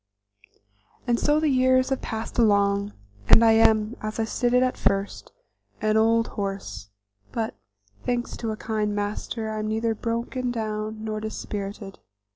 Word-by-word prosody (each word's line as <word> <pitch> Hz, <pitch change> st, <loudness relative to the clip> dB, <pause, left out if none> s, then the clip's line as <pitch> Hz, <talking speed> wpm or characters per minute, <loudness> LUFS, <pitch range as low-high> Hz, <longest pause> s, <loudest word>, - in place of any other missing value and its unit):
And 240 Hz, -2 st, +1 dB
so 295 Hz, +1 st, +3 dB
the 310 Hz, -, +1 dB
years 255 Hz, 0 st, +3 dB
have 270 Hz, -, -1 dB
passed 225 Hz, +2 st, -5 dB
along, 200 Hz, -2 st, +3 dB, 0.4 s
and 230 Hz, -, +8 dB
I 225 Hz, -, +7 dB
am, 220 Hz, 0 st, +4 dB
as 215 Hz, +1 st, -4 dB
I -, -, +2 dB
stated 245 Hz, +2 st, +2 dB
at 255 Hz, -, 0 dB
first, 195 Hz, +1 st, -1 dB, 0.5 s
an 215 Hz, 0 st, +1 dB
old 225 Hz, +1 st, +3 dB
horse, 195 Hz, -, -5 dB, 0.4 s
but, 225 Hz, -1 st, -2 dB, 0.5 s
thanks 245 Hz, 0 st, -2 dB
to 230 Hz, -, -3 dB
a 215 Hz, -, -3 dB
kind 215 Hz, -2 st, -1 dB
master, 215 Hz, +2 st, -3 dB
I 215 Hz, -, -3 dB
am 215 Hz, -, -2 dB
neither 225 Hz, +1 st, 0 dB
broken 235 Hz, +3 st, -2 dB
down 215 Hz, -2 st, -3 dB
nor 215 Hz, -1 st, -3 dB
dispirited. 205 Hz, -2 st, -6 dB
220 Hz, 150 wpm, -25 LUFS, 210-235 Hz, 0.5 s, and